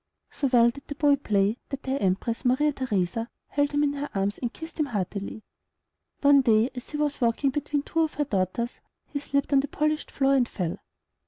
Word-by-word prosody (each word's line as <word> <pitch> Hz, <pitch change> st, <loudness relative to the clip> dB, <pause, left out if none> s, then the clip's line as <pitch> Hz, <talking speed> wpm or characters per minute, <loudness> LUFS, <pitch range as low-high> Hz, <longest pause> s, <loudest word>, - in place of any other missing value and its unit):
So 280 Hz, -, -1 dB
well 240 Hz, -2 st, +5 dB
did 280 Hz, +3 st, -13 dB
the 290 Hz, -, -5 dB
boy 290 Hz, -1 st, +4 dB
play, 210 Hz, -3 st, +1 dB
that 275 Hz, -1 st, -5 dB
the 260 Hz, -, -3 dB
Empress 200 Hz, +5 st, 0 dB
Maria 275 Hz, +4 st, +3 dB
Theresa 225 Hz, -3 st, -1 dB, 0.2 s
held 285 Hz, 0 st, +1 dB
him 290 Hz, 0 st, +2 dB
in 285 Hz, -1 st, +1 dB
her 285 Hz, 0 st, -4 dB
arms, 200 Hz, +1 st, 0 dB
and 240 Hz, -2 st, -2 dB
kissed 320 Hz, +4 st, -10 dB
him 300 Hz, -, +2 dB
heartily. 200 Hz, -1 st, -4 dB, 0.8 s
One 280 Hz, -1 st, +6 dB
day 230 Hz, 0 st, +3 dB
as 250 Hz, -1 st, -8 dB
he 300 Hz, -, -4 dB
was 295 Hz, -2 st, -1 dB
walking 240 Hz, +4 st, +2 dB
between 290 Hz, +1 st, -1 dB
two 330 Hz, -, -2 dB
of 320 Hz, -1 st, +1 dB
her 295 Hz, -, 0 dB
daughters, 210 Hz, +2 st, -2 dB, 0.2 s
he 285 Hz, -, -4 dB
slipped 280 Hz, 0 st, -1 dB
on 275 Hz, -, +6 dB
the 280 Hz, -, 0 dB
polished 305 Hz, +2 st, -1 dB
floor 275 Hz, 0 st, +2 dB
and 255 Hz, -3 st, +3 dB
fell. 175 Hz, -4 st, -3 dB
270 Hz, 210 wpm, -26 LUFS, 225-290 Hz, 0.8 s, One